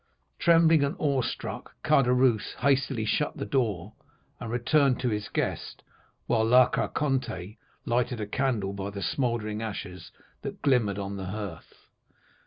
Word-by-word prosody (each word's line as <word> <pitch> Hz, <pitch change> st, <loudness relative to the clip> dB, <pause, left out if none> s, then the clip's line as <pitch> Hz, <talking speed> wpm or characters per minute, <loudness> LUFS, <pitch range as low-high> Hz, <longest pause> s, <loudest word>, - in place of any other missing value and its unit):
"Trembling 165 Hz, -3 st, +5 dB
and 140 Hz, +5 st, -1 dB
awe 140 Hz, -6 st, +1 dB
struck, 120 Hz, -, -5 dB
Caderousse 125 Hz, -6 st, +3 dB
hastily 135 Hz, -4 st, +1 dB
shut 150 Hz, +7 st, 0 dB
the -, -, -3 dB
door 110 Hz, -7 st, -1 dB, 0.5 s
and 115 Hz, -, -6 dB
returned 125 Hz, +3 st, +2 dB
to 125 Hz, -, +1 dB
his 105 Hz, -1 st, -3 dB
guest, -, -, -3 dB, 0.4 s
while 115 Hz, -2 st, +2 dB
La 125 Hz, +3 st, +6 dB
Carconte 125 Hz, -9 st, -2 dB, 0.3 s
lighted 120 Hz, 0 st, 0 dB
a 105 Hz, -, -2 dB
candle 110 Hz, -4 st, -1 dB
by 100 Hz, 0 st, -4 dB
the 100 Hz, -1 st, -6 dB
smouldering 115 Hz, -5 st, -1 dB
ashes 100 Hz, -5 st, -6 dB, 0.3 s
that -, -, -7 dB
glimmered 115 Hz, -8 st, +2 dB
on 100 Hz, 0 st, -4 dB
the 95 Hz, -, -5 dB
hearth. 95 Hz, -3 st, -7 dB
120 Hz, 140 wpm, -27 LUFS, 105-135 Hz, 0.5 s, La